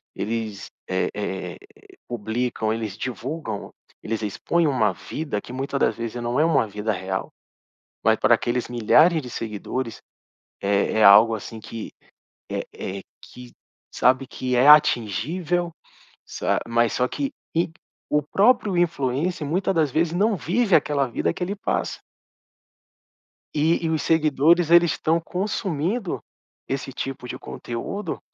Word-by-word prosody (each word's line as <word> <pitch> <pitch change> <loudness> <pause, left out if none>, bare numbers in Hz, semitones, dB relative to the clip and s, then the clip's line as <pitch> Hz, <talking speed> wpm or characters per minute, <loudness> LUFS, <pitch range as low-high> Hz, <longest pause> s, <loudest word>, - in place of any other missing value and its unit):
eles, 110 -1 -3 0.2
eh 95 0 0
eh, 100 -2 -4 0.5
publicam, 110 0 -1
eles 110 -3 -4
divulgam, 125 -3 -5 0.3
eles 110 0 -3
expõem 165 - 0
uma 110 -8 +2
vida 140 - -4
que 120 - -10
muita 135 +2 -3
das - - +2
vezes 115 +1 -5
não 120 +3 0
é 155 - +5
uma 135 -9 +3
vida 105 +2 -2
real, 95 0 -3 0.7
mas - - +4
para - - +5
aqueles 120 0 -1
milhares 155 +8 +4
de 125 - -8
seguidores, 115 +2 -4 0.6
é 100 0 +1
é - - +6
algo 105 +3 +8
assim 110 +1 -7
que 110 0 -8 0.6
é - - -2
é 95 0 -6 0.2
que 125 -1 -12 0.4
sabe? 130 +1 +3
Que 125 0 -2
é 130 +3 +4
atingível, 155 - +3 0.5
sa - - -1
mas 115 0 +2
só 125 - +1
que 280 - -3 0.2
e 170 0 +1 0.4
o 150 0 +2
próprio 200 - +2
influencer 160 0 0
muita 185 +4 0
das 155 -5 +2
vezes 160 +2 +1
não 205 +4 +2
vive 195 +4 +2
aquela 145 -3 +2
vida 115 - -1
que 180 - -4
ele 200 +3 -2
passa. - - -2 1.6
E 165 +2 +2
e - - +1
os 160 -2 0
seguidores 160 +1 +3
eles 170 -1 +6
estão 165 +1 +1
consumindo 185 +1 -2 0.5
esse 135 0 -3
tipo 135 0 -5
de - - -6
conteúdo, 165 - -5
135 Hz, 140 wpm, -24 LUFS, 115-165 Hz, 1.6 s, algo